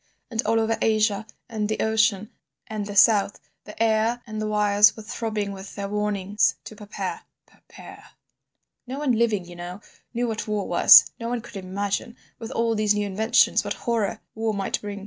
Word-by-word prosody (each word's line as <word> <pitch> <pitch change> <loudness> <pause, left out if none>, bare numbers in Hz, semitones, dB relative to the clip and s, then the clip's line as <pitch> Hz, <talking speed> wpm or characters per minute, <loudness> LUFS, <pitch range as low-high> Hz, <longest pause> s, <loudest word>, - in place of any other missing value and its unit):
And, 225 -1 0
all 225 +1 +2
over 225 0 0
Asia, 215 -1 +1 0.2
and 215 -2 -3
the 215 - -2
ocean, 215 -2 +1 0.3
and 210 -2 -5
the 205 - -7
South, 205 -1 +4 0.3
the 210 - -12
air 225 +2 +1
and 215 -2 -6
the 215 - -2
wires 210 0 +4
were 220 - -9
throbbing 215 -2 -3
with 195 0 -10
their 200 -1 -4
warnings 205 -1 0
to 215 - -10
prepare—prepare. 210 0 -10 0.8
"No 260 +2 -5
one 290 -2 0
living, 220 -5 +1
you 175 0 -12
know, 175 +2 -8 0.3
knew 245 0 -1
what 220 -1 -4
war 210 -2 -2
was; - - +8
no 230 0 -4
one 245 -1 -2
could 235 0 -14
imagine, 200 +5 -4 0.2
with 225 -1 -7
all 230 -2 0
these 210 -1 +1
new 205 0 -1
inventions, 210 +3 +2
what - - -3
horror 230 -5 -2
war 220 -1 -2
might 195 -1 -2
bring. 205 -1 -6
215 Hz, 180 wpm, -24 LUFS, 205-225 Hz, 0.8 s, was